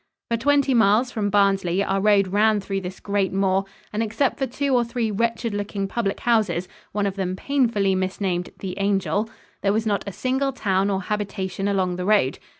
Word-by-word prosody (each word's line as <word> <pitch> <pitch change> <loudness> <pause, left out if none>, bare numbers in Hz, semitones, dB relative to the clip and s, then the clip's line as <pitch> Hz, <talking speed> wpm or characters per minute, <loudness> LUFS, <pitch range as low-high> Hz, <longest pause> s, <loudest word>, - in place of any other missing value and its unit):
For - - +3
twenty 280 +2 +2
miles 225 +2 +4
from 210 -3 -1
Barnsley 195 -2 +2
our 195 0 0
road 200 -2 +4
ran 210 +2 +3
through 195 0 -3
this 185 0 -7
great 200 -2 0
moor, 195 0 +1 0.3
and, 215 - -1
except 225 +5 0
for 270 - 0
two 275 +2 -1
or 245 -1 +4
three 235 -2 -2
wretched 230 +1 -1
looking 205 -1 -3
public 200 -1 -2
houses 210 -7 +1 0.2
one 205 0 -1
of 200 0 -2
them 185 -1 -2
painfully 225 -5 +1
misnamed 185 -1 -1
"The 190 0 -6
Angel" 195 +1 0 0.3
there 200 0 +2
was 220 +1 0
not 205 -2 0
a - - -3
single 265 +6 -1
town 195 -5 +1
or 195 -1 -1
habitation 195 -1 -3
along 185 -3 0
the 180 - -3
road. 200 -11 +2
200 Hz, 190 wpm, -23 LUFS, 195-225 Hz, 0.3 s, miles